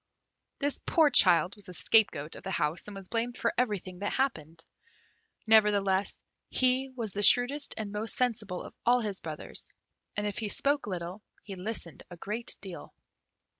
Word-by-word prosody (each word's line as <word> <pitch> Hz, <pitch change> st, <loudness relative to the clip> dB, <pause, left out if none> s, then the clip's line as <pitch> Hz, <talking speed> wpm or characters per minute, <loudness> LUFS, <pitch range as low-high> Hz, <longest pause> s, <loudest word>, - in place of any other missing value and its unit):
This 285 Hz, 0 st, +1 dB
poor 315 Hz, -3 st, +4 dB
child 180 Hz, 0 st, +5 dB
was 205 Hz, -3 st, -9 dB
the 180 Hz, -, -10 dB
scapegoat 165 Hz, -8 st, +2 dB
of -, -, -10 dB
the 195 Hz, -, -7 dB
house, 165 Hz, -1 st, -1 dB
and 205 Hz, -, -8 dB
was 195 Hz, -1 st, -4 dB
blamed 235 Hz, +3 st, -2 dB
for 230 Hz, -, -1 dB
everything 195 Hz, -7 st, -2 dB
that 205 Hz, -, -3 dB
happened. 165 Hz, -, -3 dB, 0.8 s
Nevertheless 205 Hz, -3 st, +3 dB, 0.3 s
he 255 Hz, +1 st, +1 dB
was 225 Hz, -5 st, -2 dB
the 205 Hz, -, -4 dB
shrewdest 250 Hz, +7 st, +5 dB
and 215 Hz, -2 st, -4 dB
most 210 Hz, +2 st, -2 dB
sensible 215 Hz, -7 st, -1 dB
of -, -, -11 dB
all 245 Hz, +1 st, +3 dB
his 205 Hz, -4 st, -1 dB
brothers, 155 Hz, -2 st, -5 dB, 0.5 s
and 205 Hz, -, -1 dB
if 205 Hz, -2 st, -2 dB
he 215 Hz, -, -3 dB
spoke 285 Hz, +4 st, +1 dB
little, 180 Hz, +1 st, -5 dB, 0.2 s
he 200 Hz, -, -8 dB
listened 185 Hz, -3 st, -3 dB
a 175 Hz, -, -11 dB
great 220 Hz, +7 st, -1 dB
deal. 190 Hz, -3 st, -10 dB
205 Hz, 170 wpm, -29 LUFS, 185-235 Hz, 0.8 s, child